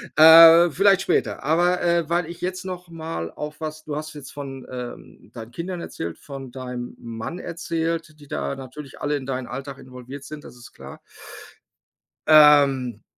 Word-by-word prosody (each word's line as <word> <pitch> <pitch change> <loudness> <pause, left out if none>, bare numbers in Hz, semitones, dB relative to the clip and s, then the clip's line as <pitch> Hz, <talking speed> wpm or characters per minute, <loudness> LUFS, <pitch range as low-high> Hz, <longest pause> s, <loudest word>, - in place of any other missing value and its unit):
Äh, 165 +2 +9
vielleicht 195 +4 +3
später. - - -1
Aber, 175 +4 +2
äh, 170 -2 +1
weil 170 0 0
ich 170 0 -9
jetzt 185 +1 -4
noch 180 -1 -7
mal 160 - -6
auf 150 +1 -7
was 155 0 -6
du 150 -2 -5
hast 155 +1 -6
jetzt 145 -3 -10
von, 135 -2 -8
ähm, 125 -1 -9
deinen 115 -1 -9
Kindern 170 +5 -5
erzählt, 85 0 -6
von 135 -3 -9
deinem 125 -1 -7
Mann 115 +9 -7
erzählt, 165 -2 -4
die 145 - -15
da 70 - -3
natürlich 135 +2 -11
alle 145 0 0
in 130 - -8
deinen 130 -2 -4
Alltag 135 +2 -7
involviert 130 +2 -11
sind. 150 0 -9
Das - - -13
ist 120 -1 -14
klar. - - -12 1.3
Ähm, 140 -6 +5
150 Hz, 170 wpm, -23 LUFS, 130-165 Hz, 1.3 s, Äh